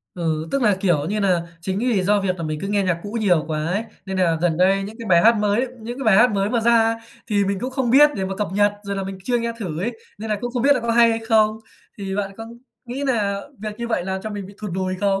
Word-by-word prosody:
Ừ, 160 Hz, -2 st, -2 dB
tức 275 Hz, -, 0 dB
là, 210 Hz, -4 st, +3 dB
kiểu 170 Hz, -7 st, +1 dB
như 210 Hz, +4 st, -1 dB
nà, 185 Hz, -4 st, +2 dB, 0.2 s
chính 190 Hz, +3 st, -2 dB
vì 230 Hz, -4 st, +1 dB
do 205 Hz, +2 st, +2 dB
việc 185 Hz, -2 st, -1 dB
là 170 Hz, -, -6 dB
mình 155 Hz, -1 st, -3 dB
cứ 195 Hz, -, -4 dB
nghe 205 Hz, 0 st, +1 dB
nhạc 180 Hz, -3 st, 0 dB
cũ 205 Hz, -, -7 dB
nhiều 180 Hz, -7 st, +3 dB
quá 155 Hz, -1 st, -2 dB
ấy, 195 Hz, +6 st, -1 dB, 0.2 s
nên 190 Hz, 0 st, -3 dB
nà 170 Hz, -3 st, +2 dB
gần 170 Hz, -2 st, +1 dB
đây 190 Hz, +3 st, +3 dB
những 210 Hz, +3 st, -7 dB
cái 230 Hz, -, -7 dB
bài 170 Hz, -2 st, +5 dB
hát 230 Hz, +1 st, +6 dB
mới 210 Hz, +4 st, +1 dB
những 240 Hz, +3 st, -6 dB
cái 270 Hz, -, -4 dB
bài 215 Hz, -4 st, +5 dB
hát 240 Hz, +4 st, +6 dB
mới 200 Hz, 0 st, 0 dB
mà 235 Hz, -, +1 dB
ra, 230 Hz, 0 st, +3 dB, 0.3 s
thì 205 Hz, -2 st, +1 dB
mình 195 Hz, 0 st, -1 dB
cũng 255 Hz, -, -3 dB
không 260 Hz, -2 st, -1 dB
biết 295 Hz, +4 st, +7 dB
để 190 Hz, -, -1 dB
mà 190 Hz, 0 st, -4 dB
cập 210 Hz, -, -1 dB
nhật, 205 Hz, +1 st, +3 dB
rồi 200 Hz, -1 st, -4 dB
là 195 Hz, -, -2 dB
mình 190 Hz, 0 st, -6 dB
chưa 245 Hz, +1 st, +1 dB
nghe 235 Hz, 0 st, -2 dB
thử 170 Hz, -7 st, -4 dB
ấy, 230 Hz, +5 st, -3 dB, 0.2 s
nên 220 Hz, +1 st, -5 dB
là 210 Hz, -, +1 dB
cũng 245 Hz, -, -3 dB
không 245 Hz, -2 st, -1 dB
biết 285 Hz, +2 st, +5 dB
là 255 Hz, -, -1 dB
có 235 Hz, 0 st, -2 dB
hay 235 Hz, 0 st, +5 dB
hay 225 Hz, -, 0 dB
không. 215 Hz, -1 st, +3 dB, 0.4 s
Thì 195 Hz, -1 st, -4 dB
bạn 200 Hz, -1 st, -2 dB
có 225 Hz, -, -7 dB, 0.4 s
nghĩ 255 Hz, +3 st, -5 dB
nà 205 Hz, -6 st, 0 dB, 0.2 s
việc 215 Hz, +1 st, -6 dB
như 235 Hz, 0 st, -4 dB
vậy 220 Hz, -6 st, -1 dB
là 190 Hz, 0 st, -2 dB
cho 215 Hz, -, -5 dB
mình 205 Hz, -2 st, -5 dB
bị 200 Hz, -, -13 dB
thụt 210 Hz, -2 st, -5 dB
lùi 185 Hz, 0 st, -1 dB
không? 195 Hz, -1 st, +1 dB
205 Hz, 300 wpm, -22 LUFS, 190-230 Hz, 0.4 s, biết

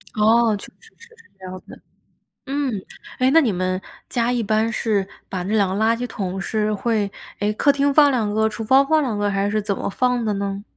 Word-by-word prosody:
哦， 220 Hz, +1 st, +4 dB
确 -, -, -9 dB
实 -, -, -21 dB
是 465 Hz, 0 st, -17 dB, 0.3 s
这 190 Hz, -, -11 dB
样 185 Hz, 0 st, -7 dB
子， -, -, -13 dB, 0.6 s
嗯。 280 Hz, -1 st, -1 dB, 0.5 s
诶， 255 Hz, 0 st, +4 dB
那 325 Hz, +3 st, +6 dB
你 245 Hz, -8 st, +1 dB
们 185 Hz, 0 st, -2 dB, 0.3 s
家 240 Hz, -1 st, 0 dB
一 245 Hz, -1 st, 0 dB
般 220 Hz, +2 st, +1 dB
是 210 Hz, -4 st, 0 dB, 0.2 s
把 185 Hz, -2 st, -3 dB
那 205 Hz, +4 st, -1 dB
2 200 Hz, -3 st, +2 dB
个 215 Hz, -, 0 dB
垃 225 Hz, +1 st, +3 dB
圾 245 Hz, -, -3 dB
桶 190 Hz, -4 st, -4 dB
是 215 Hz, +2 st, -1 dB
会 210 Hz, -1 st, -1 dB, 0.3 s
哎， 205 Hz, +1 st, +1 dB
客 285 Hz, +6 st, +3 dB
厅 280 Hz, 0 st, +1 dB
放 290 Hz, -1 st, +6 dB
2 225 Hz, -5 st, 0 dB
个， 220 Hz, +1 st, +2 dB
厨 225 Hz, +1 st, -6 dB
房 265 Hz, +5 st, +4 dB
放 315 Hz, +1 st, +3 dB
2 245 Hz, -7 st, -2 dB
个， 205 Hz, 0 st, 0 dB
还 200 Hz, 0 st, 0 dB
是 215 Hz, +1 st, 0 dB
怎 200 Hz, -1 st, -2 dB
么 -, -, -3 dB
放 250 Hz, +3 st, 0 dB
的 215 Hz, -2 st, 0 dB
呢？ 200 Hz, 0 st, -3 dB
220 Hz, 225 characters per minute, -21 LUFS, 200-250 Hz, 0.6 s, 那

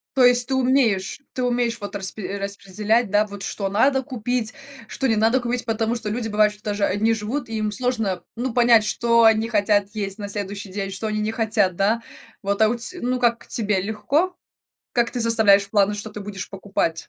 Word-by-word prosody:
То 260 Hz, -, +5 dB
есть 245 Hz, 0 st, +5 dB
ты 270 Hz, -, -1 dB
умеешь, 250 Hz, -6 st, +1 dB
ты 255 Hz, -, -3 dB
умеешь 240 Hz, -1 st, 0 dB
вот 205 Hz, 0 st, -6 dB
распре 195 Hz, 0 st, -3 dB
распределять, 200 Hz, +3 st, -1 dB
да, 210 Hz, +1 st, +3 dB
вот 205 Hz, -1 st, -9 dB
что 195 Hz, 0 st, -2 dB
надо 265 Hz, +7 st, +3 dB
купить, 245 Hz, -3 st, -2 dB, 0.3 s
что 270 Hz, -, -2 dB
не 225 Hz, -, +2 dB
надо 225 Hz, +4 st, +3 dB
купить, 245 Hz, 0 st, -2 dB
потому 225 Hz, 0 st, -1 dB
что 220 Hz, -3 st, -4 dB
люди 225 Hz, +1 st, -2 dB
бывают, 210 Hz, 0 st, +3 dB
что 210 Hz, 0 st, -18 dB
даже 205 Hz, -1 st, -1 dB
одни 215 Hz, +4 st, +2 dB
живут, 230 Hz, +5 st, -4 dB
и 225 Hz, -, -4 dB
им 215 Hz, -1 st, -1 dB
сложно 225 Hz, -6 st, -1 dB
ну 245 Hz, +1 st, -2 dB
понять, 235 Hz, -2 st, +5 dB
что 235 Hz, +1 st, +3 dB
они 220 Hz, 0 st, +4 dB
хотят 205 Hz, -2 st, +2 dB
есть 200 Hz, -1 st, -4 dB
на 205 Hz, -, -5 dB
следующий 200 Hz, 0 st, -5 dB
день, 195 Hz, 0 st, -4 dB
что 195 Hz, +3 st, -3 dB
они 215 Hz, 0 st, -1 dB
не 215 Hz, +1 st, -1 dB
хотят, 215 Hz, -5 st, +1 dB
да, 215 Hz, +4 st, +1 dB, 0.4 s
вот, 200 Hz, +1 st, -1 dB
а, 220 Hz, -, +6 dB
у 235 Hz, -, 0 dB
тя, 245 Hz, +10 st, -1 dB
ну 250 Hz, +1 st, -1 dB
как 235 Hz, -1 st, +1 dB
тебе 210 Hz, -4 st, 0 dB
легко? 285 Hz, -, -1 dB, 0.6 s
Как 240 Hz, -1 st, +1 dB
ты 245 Hz, -, -3 dB
составляешь 215 Hz, -4 st, +4 dB
планы, 205 Hz, -1 st, +3 dB
что 210 Hz, +1 st, -6 dB
ты 210 Hz, -, -8 dB
будешь 200 Hz, -1 st, -7 dB
покупать? 195 Hz, -4 st, -2 dB
220 Hz, 205 wpm, -22 LUFS, 205-240 Hz, 0.6 s, а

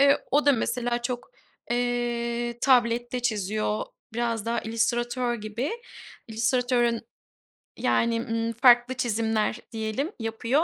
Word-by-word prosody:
Eee, 280 Hz, 0 st, +5 dB
o 290 Hz, +2 st, +3 dB
da 285 Hz, -, +7 dB
mesela 240 Hz, 0 st, -1 dB
çok, 245 Hz, 0 st, -4 dB, 0.4 s
eee, 240 Hz, -1 st, -1 dB
tablette 240 Hz, -1 st, +3 dB
çiziyor, 215 Hz, -2 st, -1 dB, 0.3 s
biraz 230 Hz, -2 st, -1 dB
daha 235 Hz, 0 st, 0 dB
illüstratör 240 Hz, +2 st, 0 dB
gibi. 215 Hz, +4 st, -3 dB, 0.6 s
İllüstratörün 240 Hz, +1 st, +1 dB, 0.8 s
yani, 230 Hz, 0 st, +2 dB
ımm, 230 Hz, 0 st, -2 dB
farklı 245 Hz, +1 st, +5 dB
çizimler 225 Hz, -2 st, 0 dB
diyelim 225 Hz, -, -2 dB
yapıyor. 230 Hz, +6 st, +1 dB
235 Hz, 105 wpm, -26 LUFS, 225-245 Hz, 0.8 s, da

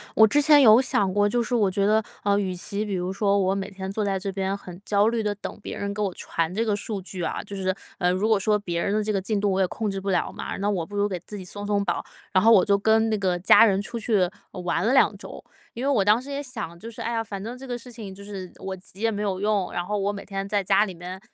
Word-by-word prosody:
我 220 Hz, -, +8 dB
之 290 Hz, +7 st, +3 dB
前 295 Hz, 0 st, +7 dB
有 230 Hz, 0 st, +8 dB
想 200 Hz, -7 st, +1 dB
过， 205 Hz, +1 st, +3 dB
就 235 Hz, +3 st, +1 dB
是 245 Hz, -, -4 dB
我 210 Hz, -5 st, +3 dB
觉 195 Hz, +1 st, 0 dB
得， 215 Hz, +2 st, +4 dB, 0.2 s
呃， 200 Hz, 0 st, +2 dB
与 185 Hz, -3 st, -2 dB
其 200 Hz, +4 st, -4 dB
比 205 Hz, -, -4 dB
如 180 Hz, 0 st, -2 dB
说 200 Hz, 0 st, +1 dB
我 190 Hz, 0 st, +2 dB
每 195 Hz, -, -3 dB
天 190 Hz, -1 st, -6 dB
坐 210 Hz, +1 st, -1 dB
在 195 Hz, -1 st, 0 dB
这 195 Hz, +1 st, -3 dB
边 195 Hz, 0 st, -2 dB
很 180 Hz, -3 st, -11 dB
焦 205 Hz, 0 st, +3 dB
虑 230 Hz, -1 st, -1 dB
地 210 Hz, -1 st, -1 dB
等 205 Hz, -, -7 dB
别 -, -, -6 dB
人 200 Hz, 0 st, -3 dB
给 210 Hz, -, -4 dB
我 195 Hz, -3 st, -1 dB
传 165 Hz, 0 st, -2 dB
这 225 Hz, -, 0 dB
个 215 Hz, -3 st, +1 dB
数 205 Hz, -1 st, -4 dB
据 185 Hz, -1 st, -7 dB
啊， -, -, -3 dB
就 200 Hz, -1 st, -8 dB
是， 185 Hz, -1 st, -1 dB, 0.2 s
呃 180 Hz, -, +2 dB
如 190 Hz, +4 st, 0 dB
果 215 Hz, -2 st, +4 dB
说 210 Hz, +2 st, +2 dB
别 170 Hz, -4 st, -3 dB
人 200 Hz, -, 0 dB
的 215 Hz, 0 st, +1 dB
这 215 Hz, -, -1 dB
个 200 Hz, -, +1 dB
进 205 Hz, +1 st, -1 dB
度 205 Hz, -1 st, +2 dB
我 190 Hz, -, 0 dB
也 190 Hz, -, +3 dB
控 215 Hz, +3 st, -3 dB
制 195 Hz, -, -3 dB
不 195 Hz, +1 st, -4 dB
了 185 Hz, -, 0 dB
嘛， -, -, -5 dB
那 200 Hz, +1 st, 0 dB
我 185 Hz, -5 st, -1 dB
不 205 Hz, -, -10 dB
如 205 Hz, 0 st, +2 dB
给 185 Hz, -, -3 dB
自 210 Hz, -, -7 dB
己 190 Hz, -, -7 dB
松 205 Hz, +3 st, -7 dB
松 205 Hz, -1 st, +1 dB
绑， -, -, -1 dB, 0.3 s
然 185 Hz, -, +4 dB
后 230 Hz, -, +7 dB
我 190 Hz, -4 st, +6 dB
就 200 Hz, -1 st, +3 dB
跟 220 Hz, +2 st, +3 dB
那 215 Hz, -, +1 dB
个 185 Hz, -3 st, 0 dB
家 195 Hz, +5 st, +7 dB
人 195 Hz, -2 st, +2 dB
出 230 Hz, +2 st, -5 dB
去 205 Hz, -5 st, +2 dB, 0.2 s
玩 180 Hz, 0 st, -2 dB
了 240 Hz, -, +3 dB
2 -, -, +4 dB
周。 -, -, -10 dB, 0.3 s
因 240 Hz, -, -5 dB
为 280 Hz, -, +1 dB
我 205 Hz, -8 st, +2 dB
当 215 Hz, +4 st, +4 dB
时 275 Hz, -, -11 dB
也 280 Hz, 0 st, -3 dB
想， 215 Hz, -10 st, -7 dB
就 230 Hz, +4 st, -8 dB
是， 230 Hz, -, -9 dB
哎 235 Hz, -, -2 dB
呀， 225 Hz, -1 st, -1 dB
反 200 Hz, -2 st, -7 dB
正 235 Hz, +3 st, -6 dB
这 270 Hz, -, -10 dB
个 245 Hz, -, -3 dB
事 245 Hz, +1 st, -10 dB
情， 220 Hz, -5 st, -8 dB
就 200 Hz, +1 st, -12 dB
是 195 Hz, -3 st, -7 dB
我 190 Hz, 0 st, -5 dB
急 190 Hz, +1 st, -14 dB
也 230 Hz, -, +3 dB
没 210 Hz, -1 st, -3 dB
有 195 Hz, -2 st, -1 dB
用， 205 Hz, -2 st, 0 dB
然 175 Hz, 0 st, -1 dB
后 210 Hz, +3 st, -2 dB
我 200 Hz, 0 st, 0 dB
每 200 Hz, -, -7 dB
天 195 Hz, -1 st, -4 dB
在 200 Hz, -1 st, 0 dB
家 195 Hz, +2 st, +4 dB
里 190 Hz, -, -7 dB
面 180 Hz, +2 st, -8 dB
200 Hz, 330 characters per minute, -25 LUFS, 190-215 Hz, 0.3 s, 我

